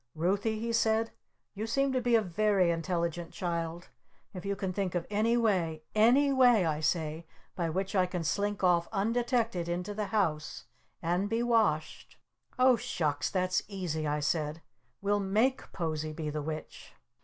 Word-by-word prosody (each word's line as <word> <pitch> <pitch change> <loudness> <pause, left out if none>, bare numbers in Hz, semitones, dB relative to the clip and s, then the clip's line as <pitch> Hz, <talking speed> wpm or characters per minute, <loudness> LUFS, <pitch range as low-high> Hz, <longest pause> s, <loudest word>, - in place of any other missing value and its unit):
"Ruthie," 200 +7 0
he 230 +1 -3
said, 225 0 +2 0.4
"you 215 +2 -4
seem 275 +4 +1
to 255 - +1
be 240 -1 +3
a 225 - +4
very 190 -1 +2
intelligent 170 0 -2
child. 170 -1 -3 0.4
If 180 -1 -7
you 200 - 0
can 190 -2 -3
think 190 -2 -2
of 175 - -1
any 220 +3 +2
way 175 -9 +1
any 255 +6 +5
way, 245 -7 +5
I 155 -2 0
say 160 0 -1 0.3
by 170 -3 -1
which 190 +5 -2
I 185 -1 +3
can 180 -2 -3
slink 200 +4 -1
off 175 -2 +3
undetected 225 -3 0
into 180 +4 -3
the 210 0 -3
house 165 -9 -1 0.4
and 175 +4 0
be 225 +2 0
washed 215 -11 0 0.2
" - - -35
"Oh 255 -2 +6
Shucks! 160 -12 -1
That's 185 -1 +1
easy!" 175 -6 -3
I 150 0 -1
said. 150 +1 -1 0.4
"We'll 205 +1 +2
make 215 +7 0
Posie 155 -3 -3
be 155 -1 -4
the 150 0 -3
Witch!" 155 +1 -7
185 Hz, 165 wpm, -30 LUFS, 165-220 Hz, 0.4 s, Oh